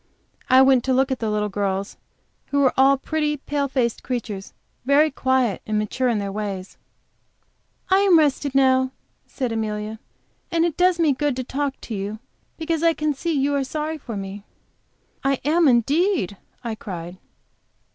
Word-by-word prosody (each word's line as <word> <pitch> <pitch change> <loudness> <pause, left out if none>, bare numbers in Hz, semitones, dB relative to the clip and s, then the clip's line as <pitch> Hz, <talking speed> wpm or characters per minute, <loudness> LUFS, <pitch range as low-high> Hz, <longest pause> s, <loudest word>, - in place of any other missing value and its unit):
I 260 +1 +7
went 265 -2 +4
to 260 - +2
look 265 +1 +2
at 260 - -1
the 225 - -1
little 210 0 0
girls, 195 0 -2 0.5
who 285 0 +1
were 265 - +4
all 270 +1 +5
pretty, 300 +1 -1
pale 285 0 -2
faced 250 -4 -1
creatures, 215 -6 -4 0.3
very 290 +4 +4
quiet 260 -6 +1
and 215 0 0
mature 230 +4 0
in 230 - +1
their 200 -1 -3
ways. 195 -2 -5 1.1
"I 380 - +6
am 390 -4 +5
rested 285 -2 +1
now," 260 -1 +3 0.3
said 255 -4 -3
Amelia, 215 -1 -3 0.5
"and 335 -1 +2
it 335 -3 -1
does 360 -1 +3
me 315 -4 +4
good 290 0 -1
to 255 - -3
talk 275 +2 -3
to 230 - -7
you, 205 +1 -4 0.4
because 325 -1 -1
I 335 0 +4
can 305 -1 0
see 325 +4 -2
that 275 - +1
you 285 +1 +1
are 280 -1 +1
sorry 310 +3 -4
for 230 -6 -6
me." 195 +1 -6 0.8
"I 275 -1 +1
am, 320 +2 +4
indeed!" 275 - +2 0.3
I 230 -2 -3
cried. 180 -4 -7
260 Hz, 175 wpm, -23 LUFS, 215-295 Hz, 1.1 s, I